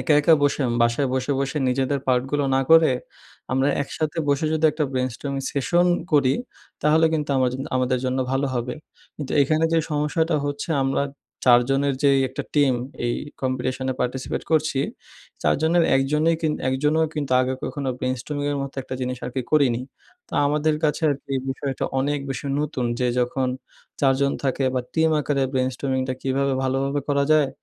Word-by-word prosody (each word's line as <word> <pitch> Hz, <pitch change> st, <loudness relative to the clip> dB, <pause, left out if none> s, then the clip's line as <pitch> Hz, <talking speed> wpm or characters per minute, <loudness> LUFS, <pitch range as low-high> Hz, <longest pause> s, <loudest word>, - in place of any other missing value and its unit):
একা, 155 Hz, -, +3 dB
একা 160 Hz, +2 st, +6 dB
বসে 145 Hz, +1 st, +2 dB
উম 120 Hz, -, -1 dB
বাসায় 120 Hz, +3 st, +2 dB
বসে, 130 Hz, +2 st, 0 dB
বসে 140 Hz, +2 st, -1 dB
নিজেদের 135 Hz, +2 st, 0 dB
part 125 Hz, -1 st, +3 dB
গুলো 145 Hz, -1 st, +1 dB
না 135 Hz, -, +3 dB
করে, 160 Hz, -4 st, +7 dB, 0.6 s
আমরা 135 Hz, +2 st, +2 dB
একসাথে 155 Hz, +3 st, -3 dB
বসে 140 Hz, +2 st, +1 dB
যদি 160 Hz, 0 st, 0 dB
একটা 155 Hz, -1 st, -1 dB
brainstorming 130 Hz, +2 st, -3 dB
session 170 Hz, +6 st, +2 dB, 0.3 s
করি, 135 Hz, -3 st, +4 dB, 0.5 s
তাহলে 160 Hz, +2 st, +4 dB
কিন্তু 150 Hz, -2 st, -1 dB
আমার 130 Hz, -1 st, +2 dB, 0.3 s
আমাদের 130 Hz, 0 st, +1 dB
জন্য 130 Hz, +1 st, 0 dB
ভালো 135 Hz, +1 st, +1 dB
হবে। 120 Hz, +1 st, -2 dB, 0.4 s
কিন্তু 145 Hz, -3 st, -5 dB
এখানে 155 Hz, +3 st, +1 dB
যে 165 Hz, -, +4 dB
সমস্যাটা 150 Hz, +2 st, +1 dB
হচ্ছে 145 Hz, +3 st, -4 dB
আমরা 135 Hz, +1 st, +1 dB, 0.4 s
৪ 120 Hz, -1 st, +7 dB
জনের 140 Hz, 0 st, +1 dB
যেই 140 Hz, -1 st, +5 dB
একটা 130 Hz, -, -5 dB
টিম 140 Hz, -3 st, +4 dB, 0.3 s
এই 120 Hz, -, 0 dB, 0.3 s
competition 130 Hz, 0 st, -2 dB
এ -, -, -10 dB
participate 125 Hz, +1 st, -3 dB
করছি। 155 Hz, -3 st, +2 dB, 0.6 s
৪ -, -, +3 dB
জনের 165 Hz, +1 st, +3 dB
১ 135 Hz, -, +4 dB
জনই 160 Hz, +2 st, +3 dB, 0.3 s
১ 130 Hz, -, +1 dB
জনও 160 Hz, +2 st, +3 dB
কিন্তু 145 Hz, -4 st, -2 dB
আগে 130 Hz, +1 st, 0 dB
কখনো 140 Hz, -2 st, -3 dB
brainstorming 135 Hz, +3 st, -2 dB
এর -, -, -2 dB
মতো 140 Hz, -, -6 dB
একটা 130 Hz, -, -6 dB
জিনিস 125 Hz, 0 st, -3 dB
আরকি 125 Hz, +1 st, -3 dB
করিনি। 130 Hz, -5 st, +3 dB, 0.5 s
তো -, -, -22 dB
আমাদের 150 Hz, +1 st, +1 dB
কাছে 150 Hz, +2 st, 0 dB
আর -, -, +2 dB
কি 140 Hz, -, -7 dB, 0.2 s
বিষয়টা 135 Hz, 0 st, -3 dB, 0.2 s
অনেক 145 Hz, +2 st, 0 dB
বেশি 135 Hz, +2 st, -4 dB
নতুন 140 Hz, -4 st, -2 dB, 0.2 s
যে 125 Hz, -, +2 dB
যখন 130 Hz, +1 st, 0 dB, 0.5 s
৪ 135 Hz, -2 st, +4 dB
জন 140 Hz, 0 st, +2 dB
থাকে 135 Hz, 0 st, 0 dB
বা, 125 Hz, -, +1 dB
টিম 160 Hz, 0 st, +3 dB
আকারে 140 Hz, -1 st, 0 dB
brainstorming 130 Hz, 0 st, -1 dB
টা 130 Hz, -, -1 dB
কীভাবে 135 Hz, +1 st, 0 dB
ভালোভাবে 135 Hz, +2 st, 0 dB
করা 140 Hz, -1 st, +2 dB
যায় 150 Hz, -3 st, +4 dB
140 Hz, 180 wpm, -23 LUFS, 130-150 Hz, 0.6 s, করে